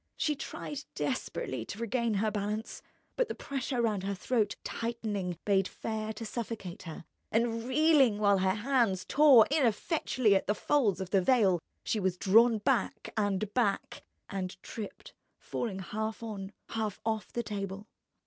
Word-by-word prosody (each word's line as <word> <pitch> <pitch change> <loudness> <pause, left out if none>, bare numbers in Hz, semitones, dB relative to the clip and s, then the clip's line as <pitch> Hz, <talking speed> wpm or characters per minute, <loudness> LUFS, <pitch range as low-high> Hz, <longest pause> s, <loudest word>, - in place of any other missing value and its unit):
She 300 - +1
tried 290 0 -6
desperately - - -2
to - - -7
regain 235 -1 0
her 215 +2 +1
balance, 210 +1 -3 0.3
but - - +1
the - - -4
pressure 260 -3 -2
round 210 -4 +1
her 200 +1 -2
throat, 215 +2 0
tightening, 210 -6 -3
bade 195 -2 +3
fair 220 -1 -4
to 225 +2 -7
suffocate 220 -5 -5
her; 160 - -8 0.3
and 230 0 +1
reeling, 275 -5 +4
while 200 -2 +4
her 190 0 +2
hands 225 -5 +1
tore 275 -6 +7
ineffectually 255 - +2
at 190 - +1
the 210 - +2
folds 210 -8 +2
of 190 -1 -5
the 195 - +4
veil, 195 -6 +3 0.2
she 220 - 0
was 185 -2 0
drawn 225 +5 +5
back 225 +1 -1
and 205 -1 0
back, 220 -6 0 0.3
and 190 -2 -4
tripped, 215 -3 -8 0.2
falling 210 -5 -4
half 215 +4 -4
on, 200 -3 -5 0.2
half 215 -3 -2
off 220 -1 -2
the 235 - -2
table. 200 -1 -5
215 Hz, 155 wpm, -31 LUFS, 195-235 Hz, 0.3 s, tore